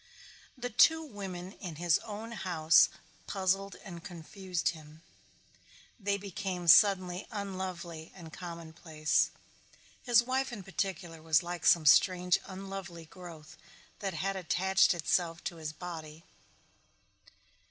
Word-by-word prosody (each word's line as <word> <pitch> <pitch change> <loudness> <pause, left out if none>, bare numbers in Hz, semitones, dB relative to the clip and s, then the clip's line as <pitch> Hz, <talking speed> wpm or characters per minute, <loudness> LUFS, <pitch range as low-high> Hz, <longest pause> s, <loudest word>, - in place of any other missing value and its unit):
The 245 0 -4
two 320 +8 +5
women 190 -7 -7
in 180 -5 -8
his 170 0 +2
own 220 +1 -7
house 170 -7 +4 0.4
puzzled 195 0 0
and 175 -4 -9
confused 180 +1 -3
him. 155 -1 -10 1.0
They 200 -1 0
became 195 -3 -5
suddenly 185 0 +5
unlovely 185 -5 -5
and 165 -4 -11
commonplace. 160 -3 -1 0.7
His 240 -1 +5
wife 260 +2 -1
in 210 -5 -7
particular 180 -4 -4
was 160 -1 +3
like 175 -1 -3
some 165 -2 +5
strange 180 +4 +5
unlovely 190 -3 -7
growth 165 -2 -12 0.4
that 195 -2 -3
had 195 +1 -1
attached 190 +1 +3
itself 170 0 0
to 170 - -4
his 155 -1 -5
body. 160 -1 -8
180 Hz, 115 wpm, -31 LUFS, 165-195 Hz, 1.0 s, two